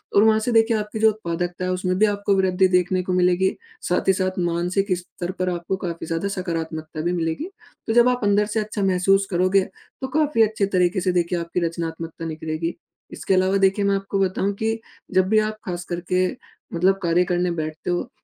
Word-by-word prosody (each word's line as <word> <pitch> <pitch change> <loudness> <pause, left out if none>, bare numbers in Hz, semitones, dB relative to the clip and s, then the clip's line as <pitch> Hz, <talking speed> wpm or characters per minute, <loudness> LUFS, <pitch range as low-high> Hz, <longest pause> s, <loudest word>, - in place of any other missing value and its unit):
और 205 - +7
वहाँ 220 0 +5
से - - +2
देखिए 225 0 +4
आपकी 210 +1 -4
जो 220 - +6
उत्पादकता 175 -3 -4
है 185 - -1
उसमें 185 0 -1
भी 215 - +6
आपको 205 -1 +1
वृद्धि 190 0 +3
देखने 180 0 +2
को 185 - -2
मिलेगी। 180 +1 +2 0.3
साथ 180 - 0
ही - - +6
साथ 185 0 -1
मानसिक 180 +3 0
स्तर 175 0 -6
पर 185 0 +1
आपको 175 +2 -3
काफ़ी 170 -1 -4
ज़्यादा 165 +4 -1
सकारात्मकता 160 -3 -4
भी 175 +2 0
मिलेगी। 170 - -2 0.4
तो 225 - +1
जब 240 +1 +6
आप 250 0 0
अंदर 205 +1 +3
से - - +3
अच्छा 210 -1 -3
महसूस 195 +1 +3
करोगे 185 +2 +3 0.4
तो 265 - -2
काफ़ी 300 -6 +2
अच्छे 215 -2 +1
तरीके 180 +1 +2
से 185 0 +1
देखिए 175 0 0
आपकी 170 +1 -2
रचनात्मकता 165 -1 -5
निखरेगी। 160 +1 -3 0.4
इसके - - -1
अलावा 185 +1 +3
देखिए 195 +1 +2
मैं 200 - +3
आपको 195 0 -2
बताऊँ 195 +1 0
कि 225 0 0 0.3
जब 185 0 +3
भी 215 0 +5
आप 215 0 -1
खास 175 -1 -4
करके 180 +1 0 0.5
मतलब 185 +3 +3
कार्य 170 +1 +3
करने 180 0 0
बैठते 155 -1 -4
हो 175 +7 -2
185 Hz, 200 wpm, -23 LUFS, 175-200 Hz, 0.5 s, और